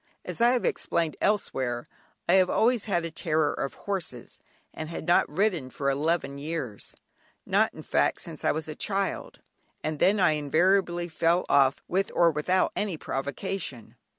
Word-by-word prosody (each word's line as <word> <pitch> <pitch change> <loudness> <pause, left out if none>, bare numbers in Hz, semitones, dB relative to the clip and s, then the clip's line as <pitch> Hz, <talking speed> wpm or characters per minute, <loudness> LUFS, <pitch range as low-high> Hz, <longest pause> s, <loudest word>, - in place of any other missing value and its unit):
As - - -4
I 235 - +6
have 250 - 0
explained 165 -2 0
elsewhere, 130 - 0 0.4
I - - +4
have 185 -1 +5
always 235 -1 +2
had 175 -5 0
a 165 - -5
terror 155 -2 0
of 135 - -4
horses, 175 - -5 0.3
and 155 0 -6
had 170 - -6
not 175 - +3
ridden 175 -5 0
for 140 +1 -1
eleven 140 -1 -1
years, 140 -8 -5 0.5
not - - +2
in - - -9
fact - - +1
since - - -6
I - - +3
was 155 0 -3
a 155 - -5
child, 195 +3 -2 0.4
and 155 -1 -2
then 200 +2 +4
I 170 - +5
invariably 175 +4 +2
fell 170 +2 +1
off 135 -1 +3
with 190 +2 0
or 170 -1 +5
without 170 +5 +1
any 200 -6 -2
provocation. 140 - -4
165 Hz, 165 wpm, -27 LUFS, 145-190 Hz, 0.5 s, I